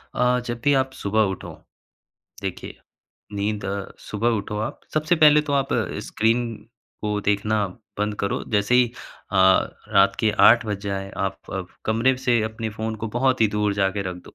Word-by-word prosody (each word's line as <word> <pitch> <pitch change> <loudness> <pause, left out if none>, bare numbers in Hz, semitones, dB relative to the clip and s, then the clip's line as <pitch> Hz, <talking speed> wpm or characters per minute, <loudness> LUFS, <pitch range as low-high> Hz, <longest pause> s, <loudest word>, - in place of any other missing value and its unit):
अ, 125 0 +2
जब 120 -1 -4
भी 145 - +4
आप 130 0 +1
सुबह 110 -1 0
उठो 95 - -7 0.9
देखिए, - - -5 0.6
नींद 105 +1 -2
अ, 100 0 -3
सुबह 110 +3 -2
उठो 105 +1 -5
आप, 110 +2 -4
सबसे 155 +3 +2
पहले 150 -1 +7
तो 150 -1 -4
आप 135 -1 +1 0.4
स्क्रीन 115 +2 +1 0.6
को 105 -1 -1
देखना 105 +1 +1 0.3
बंद 105 0 0
करो। 100 - -1
जैसे 105 +3 +2
ही 125 -1 +6 0.5
अ, 100 - 0 0.5
रात 100 -2 +4
के 110 - +3 0.2
8 120 0 +4
बज 105 -2 -2
जाए, 95 -1 -4
आप 95 -1 -2
अब 95 -2 -4 0.2
कमरे 115 +4 +2
से 125 -2 +2
अपने 110 +1 -3
फ़ोन 110 +1 -4
को 110 +1 -4
बहुत 130 0 +2
ही 110 - +6
दूर 105 -1 +1
जाके 100 0 0
रख 90 - -7
दो। 90 - -15
110 Hz, 175 wpm, -23 LUFS, 100-125 Hz, 0.9 s, पहले